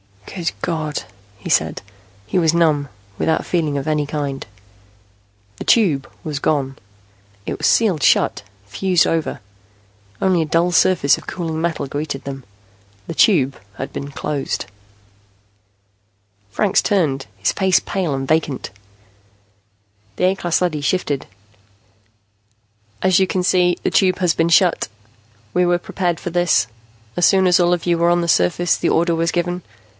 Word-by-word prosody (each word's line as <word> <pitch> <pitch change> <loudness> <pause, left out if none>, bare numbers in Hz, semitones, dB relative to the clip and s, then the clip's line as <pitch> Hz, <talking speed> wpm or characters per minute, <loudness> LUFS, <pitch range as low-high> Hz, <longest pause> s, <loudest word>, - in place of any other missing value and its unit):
"Good 175 -3 -3
God," 155 -3 -2 0.3
he - - -8
said. - - +1 0.4
He 145 - 0
was 165 -2 +3
numb, 155 -4 +2 0.3
without 160 - 0
feeling 155 -5 0
of 140 - -3
any 150 -2 0
kind. 140 -2 -4 1.1
The - - -7
Tube 165 - +3
was 150 -2 -4
gone. 135 -3 -1 0.7
It - - -4
was - - +1
sealed 195 -10 +3
shut, - - +3 0.2
fused 180 - +1
over. 160 -7 -1 0.8
Only 185 -3 +2
a - - 0
dull 165 +3 +1
surface 170 -4 +3
of - - -13
cooling 165 -3 -4
metal 165 -3 -1
greeted 145 0 -4
them. 135 -2 -7 0.6
The - - -4
Tube 145 - +3 0.2
had 135 - -6
been 140 - -5
closed. 145 0 -3 1.8
Franks 195 - +2
turned, 150 -10 0
his - - +1
face 190 -2 +2
pale 180 -7 -2
and 135 0 -3
vacant. 155 -3 -1 1.4
The - - -3
A 185 +1 +3
class 175 -3 -1
leady 165 -5 0
shifted. 145 -3 -1 1.8
"As 185 -1 +4
you 190 - +3
can 185 0 -1
see, 180 -1 +3
the - - 0
Tube 185 -2 +3
has 180 -3 +2
been 165 +1 +1
shut. 170 +1 +3 0.7
We 180 - +3
were 175 0 +3
prepared 175 -1 -2
for - - -4
this. 175 -7 +2 0.5
As 175 - +4
soon 190 +1 +4
as 180 0 +4
all 175 0 +3
of 175 - -2
you 170 -1 +2
were 170 +1 +3
on 175 0 +3
the 170 - -2
surface, 165 - +2
the - - 0
order 170 +1 +2
was 165 0 0
given. 175 +1 -2
165 Hz, 150 wpm, -19 LUFS, 145-180 Hz, 1.8 s, As